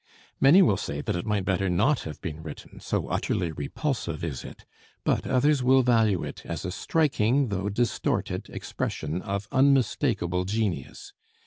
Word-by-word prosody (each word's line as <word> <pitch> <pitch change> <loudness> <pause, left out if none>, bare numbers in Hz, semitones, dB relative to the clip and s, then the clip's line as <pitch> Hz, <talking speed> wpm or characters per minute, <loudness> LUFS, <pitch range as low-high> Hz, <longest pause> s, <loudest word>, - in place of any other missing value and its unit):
Many 165 +8 +7
will 100 - +3
say 75 -7 -4
that - - -2
it 85 - -4
might 105 -3 0
better 95 0 +1
not 130 +11 +2
have 75 - -8
been 80 -4 -5
written, 80 -2 -10
so - - -2
utterly 85 -3 -1
repulsive 85 - -3
is 75 -7 -4
it, - - -11 0.4
but - - 0
others 140 +2 +3
will 130 +1 +5
value 115 -6 +3
it - - -7
as 85 +1 -5
a 90 - -2
striking, 135 - +1
though 100 0 -2
distorted, 120 +4 -1
expression 80 +4 -4
of 100 +1 -4
unmistakable 130 - +2
genius. 105 -2 -3
100 Hz, 155 wpm, -26 LUFS, 85-130 Hz, 0.4 s, Many